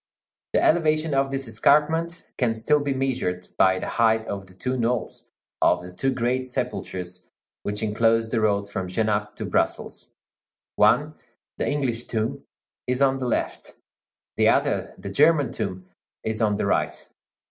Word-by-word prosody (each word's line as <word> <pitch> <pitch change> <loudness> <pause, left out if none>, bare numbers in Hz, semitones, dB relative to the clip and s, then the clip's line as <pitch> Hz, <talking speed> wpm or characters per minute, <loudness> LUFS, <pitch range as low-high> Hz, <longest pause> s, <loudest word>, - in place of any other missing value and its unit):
The - - +3
elevation 155 -2 +2
of 135 0 +2
this 135 -1 -3
escarpment 155 +9 +2
can 120 -4 +1
still 150 +7 +2
be 145 -1 -2
measured 125 -9 -2
by 95 0 +5
the - - -4
height 110 -1 +2
of 100 -1 -5
the 95 - -15
two 125 +6 -2
knolls 120 -1 -2 0.3
of 90 0 +3
the 90 0 -10
two 110 +9 0
great 130 +1 -1
sepulchres 90 -7 -4 0.3
which 105 +1 -3
enclose 115 +1 +2
the 115 0 0
road 100 -2 +1
from 95 -2 -4
Genappe 105 +2 -1
to - - -5
Brussels: - - -1 0.7
one, - - +4 0.5
the - - 0
English 130 -5 -1
tomb, 110 -1 -2 0.4
is 125 0 0
on 135 -1 +2
the 130 - -2
left; 120 - -2 0.6
the - - +5
other, - - +1
the 100 - -7
German 145 +2 +4
tomb, 90 0 -4 0.4
is 110 +1 -2
on 105 -2 +2
the - - -1
right. - - -1
115 Hz, 160 wpm, -24 LUFS, 105-135 Hz, 0.7 s, by